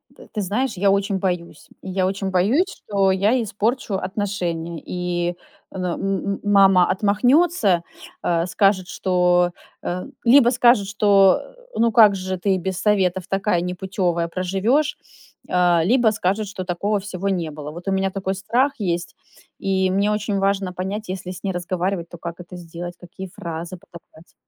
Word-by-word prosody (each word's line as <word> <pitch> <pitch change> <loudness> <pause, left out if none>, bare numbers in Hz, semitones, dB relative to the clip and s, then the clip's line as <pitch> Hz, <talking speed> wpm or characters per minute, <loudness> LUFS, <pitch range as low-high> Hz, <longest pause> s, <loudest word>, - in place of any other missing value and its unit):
Т - - -15
ты 210 - -2
знаешь, 220 +8 -1
я 200 +2 +3
очень 200 0 +1
боюсь, 180 -4 -4
я 190 0 -1
очень 195 0 -2
боюсь, 210 - +3 0.2
что 195 -2 +2
я 210 +7 +2
испорчу 215 +2 -2
отношения, 180 -4 -3
и, 175 -1 -2 0.4
но, 180 -2 -3
м 195 0 -2
м - - -11
мама 195 -3 +5
отмахнется, 210 - +3 0.4
а, 170 0 +1
скажет, 190 0 +2
что, 180 -1 +2 0.3
э, 180 +1 -3 0.2
либо 240 0 +6
скажет, 240 -5 +4
что: 200 -2 +4 0.3
"Ну, 230 0 +2
как 215 -3 +6
же 185 0 -3
ты 190 +1 +1
без 190 +1 -3
советов 190 -3 +1
такая 195 -2 +1
непутевая 180 -1 -1
проживешь", 210 - 0 0.5
а, 175 -2 +3
либо 235 +3 +4
скажет, 205 +1 -1
что 190 -1 -6
"Такого 200 +4 -1
всего 195 0 -4
не 175 -5 -1
было". 150 0 -7
Вот 175 +4 -10
у - - +1
меня 195 0 +1
такой 190 0 -3
страх 240 +8 +1
есть, 175 -3 -2 0.4
и 190 -1 +1
мне 200 +2 +1
очень 210 -1 -1
важно 195 -1 0
понять, 195 +4 -4
если 185 -1 -5
с 185 0 -10
ней 195 - -1
разговаривать, 180 0 -2
то 175 - -10
как 170 +1 -7
это 180 +1 -10
сделать, 175 +1 -8
какие 185 +2 -9
фразы 170 -1 -6
подобрать. 170 -1 -17
190 Hz, 160 wpm, -22 LUFS, 180-205 Hz, 0.5 s, либо